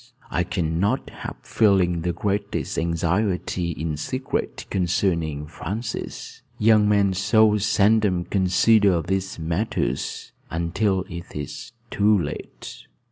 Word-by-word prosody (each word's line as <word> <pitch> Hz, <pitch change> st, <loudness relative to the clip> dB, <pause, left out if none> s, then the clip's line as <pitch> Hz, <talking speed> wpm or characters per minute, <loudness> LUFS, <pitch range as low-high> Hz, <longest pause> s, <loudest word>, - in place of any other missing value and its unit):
I 90 Hz, -, +1 dB
cannot 90 Hz, +7 st, -1 dB
help -, -, -9 dB
feeling 95 Hz, -6 st, +3 dB
the 90 Hz, +1 st, 0 dB
greatest 100 Hz, +2 st, -2 dB
anxiety 85 Hz, +2 st, 0 dB
in 80 Hz, -1 st, -3 dB
secret 130 Hz, -, -3 dB
concerning 85 Hz, -5 st, 0 dB
Francis. 105 Hz, +9 st, -6 dB, 0.2 s
Young 105 Hz, -1 st, +4 dB
men 100 Hz, -2 st, +3 dB
so 105 Hz, +2 st, +3 dB
seldom 105 Hz, -2 st, +3 dB
consider 95 Hz, 0 st, +3 dB
these 95 Hz, +3 st, -2 dB
matters 80 Hz, -, -2 dB, 0.2 s
until 95 Hz, +3 st, 0 dB
it 85 Hz, +1 st, -9 dB
is 75 Hz, +9 st, -6 dB, 0.2 s
too 105 Hz, +1 st, +4 dB
late." 75 Hz, -6 st, -6 dB
95 Hz, 105 wpm, -23 LUFS, 85-105 Hz, 0.2 s, Young